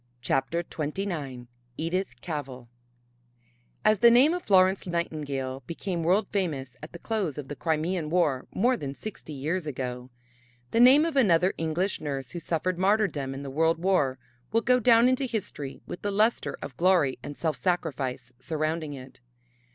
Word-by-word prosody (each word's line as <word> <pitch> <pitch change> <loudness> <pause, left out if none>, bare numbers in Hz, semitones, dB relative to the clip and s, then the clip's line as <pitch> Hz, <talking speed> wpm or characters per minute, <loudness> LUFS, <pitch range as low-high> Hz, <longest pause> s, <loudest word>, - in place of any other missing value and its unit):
CHAPTER 135 +7 0
XXIX 150 -6 -4 0.3
EDITH 180 +4 -3
CAVELL 135 -7 -6 1.2
As 215 -2 +4
the 235 - +8
name 255 +7 +6
of 360 - -2
Florence 190 - +3
Nightingale 145 -6 -3
became 175 +1 -3
world 185 +6 +3
famous 145 -10 -2
at 155 - -9
the 170 - -8
close 195 -7 -2
of 145 -3 -6
the 145 - -5
Crimean 160 +1 -1
War 155 -7 +1
more 245 +6 +2
than 140 - -5
sixty 210 -5 -8
years 155 +5 -2
ago, 125 -2 -4 0.6
the 230 - +2
name 265 +6 +7
of 330 -3 -2
another 185 -8 +4
English 165 +4 -1
nurse 135 -4 -4
who 175 - -5
suffered 175 +2 -2
martyrdom 190 -9 +1
in 140 - -6
the 135 - -6
World 160 +3 +2
War 165 -7 +1 0.3
will 230 +2 +3
go 250 +2 +3
down 235 0 +5
into 255 +1 +1
history 200 - -5
with - - -7
the 205 - -1
lustre 215 +4 +1
of 135 - -7
glory 175 -7 +3
and 145 - -8
self 160 -2 -1
sacrifice 135 -8 -2
surrounding 155 +1 -2
it. 130 -1 -11
165 Hz, 160 wpm, -27 LUFS, 140-195 Hz, 1.2 s, the